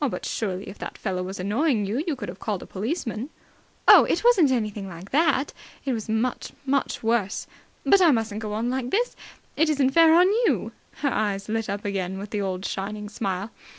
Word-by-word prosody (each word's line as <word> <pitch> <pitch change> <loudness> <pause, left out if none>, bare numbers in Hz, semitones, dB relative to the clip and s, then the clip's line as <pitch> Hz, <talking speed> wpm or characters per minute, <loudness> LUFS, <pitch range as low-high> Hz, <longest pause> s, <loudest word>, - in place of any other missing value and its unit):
"But - - -5
surely, 195 -3 -3
if 195 - -9
that - - -6
fellow 185 -3 -2
was 190 +2 -5
annoying 215 - +1
you, 230 +9 -1
you 315 - 0
could 220 -6 -6
have 180 +2 -8
called 205 -4 -3
a - - -10
policeman?" 230 - -3 0.6
"Oh, - - +10
it - - 0
wasn't 405 - +5
anything 215 -5 -1
like 175 +2 -10
that. 295 -2 +2 0.3
It 270 - 0
was 220 -2 -4
much, 225 +3 -1
much 275 -2 0
worse. 225 -3 0 0.4
But 395 - +5
I 350 - +7
mustn't 225 -5 0
go 210 -1 -4
on 225 +3 -1
like 255 -1 -2
this. 480 - 0 0.4
It 320 +1 +3
isn't 275 -3 +2
fair 325 +2 +6
on 355 +1 +7 0.2
you." - - 0 0.3
Her 280 -3 +1
eyes 200 -1 -1
lit 225 -1 -1
up 200 +1 -4
again 190 -2 -2
with 200 +1 -7
the 210 - -1
old 190 -1 -3
shining 210 +2 -4
smile. 200 0 -3
220 Hz, 205 wpm, -25 LUFS, 200-270 Hz, 0.6 s, Oh